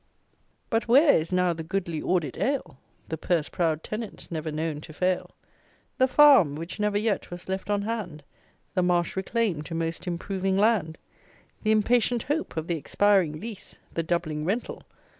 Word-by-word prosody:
But 225 0 +1
where 280 +5 +6
is 160 +2 0
now 180 -1 +2
the 165 - -6
goodly 170 -1 -3
audit 170 -8 0
ale? 215 - -2 0.3
The 160 - -4
purse 165 -4 0
proud 160 -3 0
tenant, 215 0 -6
never 160 -1 -3
known 155 -1 -3
to 155 - -11
fail? 180 +3 0 0.7
The 260 - +5
farm 265 - +6
which 165 +6 -7
never 210 -1 +1
yet 210 -1 -1
was 175 0 -8
left 190 +2 -4
on 205 -1 +1
hand? 205 -9 -4 0.5
The 185 - +2
marsh 175 -1 +1
reclaim'd 190 -6 -1
to 165 - -5
most 165 +1 -3
improving 190 +2 -1
land? 200 -7 +2 0.6
The 215 - -1
impatient 230 +2 +2
hope 295 - -2
of 160 - -1
the 170 -1 -1
expiring 180 0 +2
lease? 220 0 -8 0.2
The 165 - 0
doubling 160 -2 -2
rental? 205 +9 -2
180 Hz, 165 wpm, -26 LUFS, 160-215 Hz, 0.7 s, where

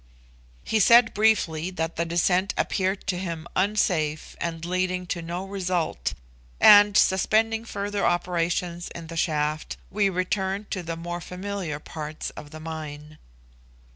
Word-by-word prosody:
He 220 - +1
said 235 +3 +6
briefly 185 -6 +2
that 165 -3 -3
the 170 - -1
descent 180 +3 +1
appeared 190 0 0
to 180 -2 -1
him 170 -3 -4
unsafe, 180 -6 0
and 165 -1 -3
leading 185 0 -1
to 175 -1 -3
no 175 +3 -4
result; 180 - -2 0.4
and, 205 0 +8
suspending 220 +4 +3
further 205 -2 -3
operations 175 0 0
in 170 - -7
the - - -7
shaft, 155 -2 -1
we 200 0 +2
returned 190 +2 -2
to 190 - -2
the 165 -1 -5
more 175 +1 -5
familiar 180 -3 -4
parts 155 0 -6
of 145 - -10
the 155 - -10
mine. 155 -1 -7
180 Hz, 140 wpm, -25 LUFS, 165-195 Hz, 0.4 s, and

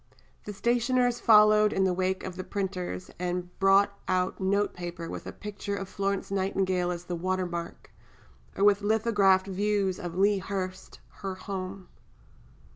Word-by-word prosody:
The 210 - -5
stationers 245 +3 +1
followed 215 -1 +6
in 190 - +1
the 185 -1 +2
wake 185 +1 -1
of 185 -2 -6
the 185 - -5
printers, 185 - -4
and 180 0 -3
brought 200 +1 +4
out 185 0 0
note 200 +2 +1
paper 175 -1 -6
with - - -7
a - - -4
picture 205 -1 -5
of 195 -1 -5
Florence 195 0 -2
Nightingale 190 -2 0
as 175 -1 -4
the 180 0 -4
water 185 +2 -1
mark, 170 -1 -6 0.7
or 195 - +1
with 205 0 +5
lithographed 205 -3 +3
views 200 -1 0
of 175 -1 -6
"Lea 200 +1 +3
Hurst, 185 -1 -5 0.2
her 195 -2 -3
home." 185 -1 -6
195 Hz, 155 wpm, -28 LUFS, 185-205 Hz, 0.7 s, followed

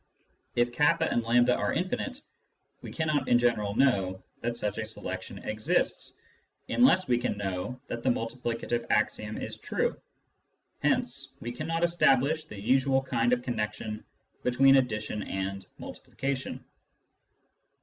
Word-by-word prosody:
If 120 0 +2
k 135 - 0 0.2
and 120 - +1 0.2
A 125 - +5
are - - 0
infinite, 245 - -2 0.6
we - - -8
cannot 155 -3 0
in 120 - +6
general 110 -4 +1
know 95 -8 +2 0.2
that 120 0 -2
such 105 -2 -2
a 110 - -2
selection 110 - -6
exists, 110 +12 -1 0.6
unless 215 -7 +4
we 120 -1 +3
can 120 -4 -1
know 100 +5 -3
that 115 - -5
the 130 - +1
multi 115 -1 -1
plicative 120 -1 -2
axiom 105 0 0
is - - -6
true. - - -1 0.9
Hence - - 0
we 120 - -5
cannot 165 +7 -2
establish 155 -3 +3
the 105 - -9
usual 135 +4 +3
kind 120 -2 +1
of 125 0 +2
connection 105 -2 -3 0.4
between 135 +2 +5
addition 110 -4 -1
and 95 0 -4
multiplication. 135 -1 -5
120 Hz, 135 wpm, -29 LUFS, 110-135 Hz, 0.9 s, in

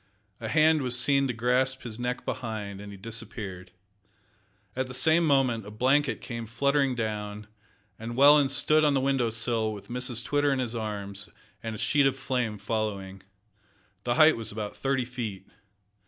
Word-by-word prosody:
A 115 - -5
hand 155 +6 +4
was 125 -2 +2
seen 140 +1 +3
to - - -1
grasp 125 +3 0
his 115 -1 -6
neck 125 +1 -3
behind, 105 -4 -5
and 100 0 -9
he 100 - -10
disappeared. 100 -3 -5 1.1
At 130 0 -1
the 130 - -6
same 160 +4 +5
moment 130 -6 +2
a 105 - -9
blanket 130 +7 +1
came 115 -2 -6
fluttering 140 +3 +1
down, 105 -2 -4 0.5
and 115 +1 -6
Welland 145 +1 +6
stood 145 +3 +3
on 145 -2 +3
the - - +3
window 135 -3 +1
sill 115 -1 -1
with 105 -2 -9
Mrs 125 0 -2
Twitter 145 0 +1
in 135 - +1
his 125 -3 -2
arms, 105 -2 -5 0.3
and 115 -1 -5
a - - -6
sheet 145 +5 +3
of 135 - 0
flame 125 -5 -2
following. 100 -2 -3 0.8
The 120 - 0
height 155 0 +6
was 115 -1 -5
about 105 -1 -5
thirty 135 -2 -1
feet. 115 -6 -6
120 Hz, 170 wpm, -27 LUFS, 110-135 Hz, 1.1 s, Welland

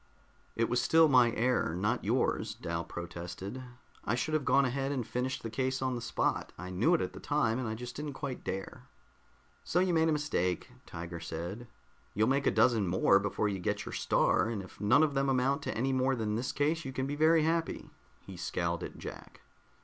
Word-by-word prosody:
"It 115 0 +1
was 120 0 +1
still 160 +3 +5
my 125 -4 +6
error, 125 -8 +1
not 105 +7 0
yours," 110 -1 0
Dal 85 -6 -3
protested. 90 +8 -7 0.4
"I 110 - 0
should 155 +6 -2
have 155 -3 +1
gone 140 0 +4
ahead 135 +2 -1
and 130 -5 -2
finished 125 +2 -3
the 115 - -3
case 130 +3 -1
on 130 -1 -1
the 120 - -4
spot. 120 - -1
I 90 +1 -7
knew 115 - +3
it - - 0
at - - -3
the - - -9
time, 135 -6 +1
and 130 - -2
I 110 - -3
just 120 +2 -7
didn't 150 -1 -4
quite 135 -2 -5
dare." 95 0 -5 0.8
"So 175 - +1
you 185 -1 +2
made 160 0 +3
a - - +3
mistake," 120 - -1 0.2
Tiger 85 0 -6
said. 85 +8 -6 0.5
"You'll 110 +3 +3
make 140 +1 +2
a - - +7
dozen 115 -6 +3
more 95 +2 +4
before 100 +1 -1
you 100 -2 -2
get 90 - -2
your - - -6
Star, - - +2
and 105 -4 -3
if 95 - -14
none 120 +9 +5
of 150 -2 +1
them 135 0 +1
amount 135 +3 +2
to - - -3
any 135 +3 +1
more 130 +1 +2
than 110 -3 -2
this 120 +4 -1
one, 150 +3 +3
you 135 - -6
can 130 0 -2
be 140 +2 -3
very 160 +1 +4
happy." 165 +1 -1 0.3
He - - -9
scowled - - -2
at - - -7
Jack. - - -9
125 Hz, 215 wpm, -31 LUFS, 105-140 Hz, 0.8 s, a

